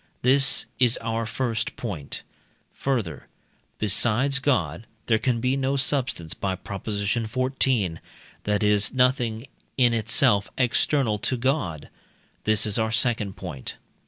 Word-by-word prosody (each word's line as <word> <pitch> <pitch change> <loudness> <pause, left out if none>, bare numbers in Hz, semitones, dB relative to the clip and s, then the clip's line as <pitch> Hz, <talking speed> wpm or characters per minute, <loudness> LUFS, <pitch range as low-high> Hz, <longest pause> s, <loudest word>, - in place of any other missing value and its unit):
This 135 +1 +4
is 125 -2 +4
our 115 0 -2
first 115 -2 -2
point. 90 - -6 0.5
Further, 110 - -2 0.5
besides 120 +6 +2
God 110 - 0 0.2
there 110 -2 +2
can 120 -1 0
be 125 +3 +1
no 135 0 0
substance 130 - -1
(by 95 -1 -2
Prop. 100 +1 -8
xiv.), 110 - 0 0.5
that 105 0 +1
is 105 +1 +3
nothing 125 -3 +1 0.3
in 120 -3 +4
itself 110 -2 +2
external 125 -2 +1
to 125 +3 -1
God. 115 - -1 0.6
This 110 0 +3
is 105 +1 0
our 110 0 0
second 110 -3 +1
point. 75 -10 -6
115 Hz, 125 wpm, -25 LUFS, 100-130 Hz, 0.6 s, This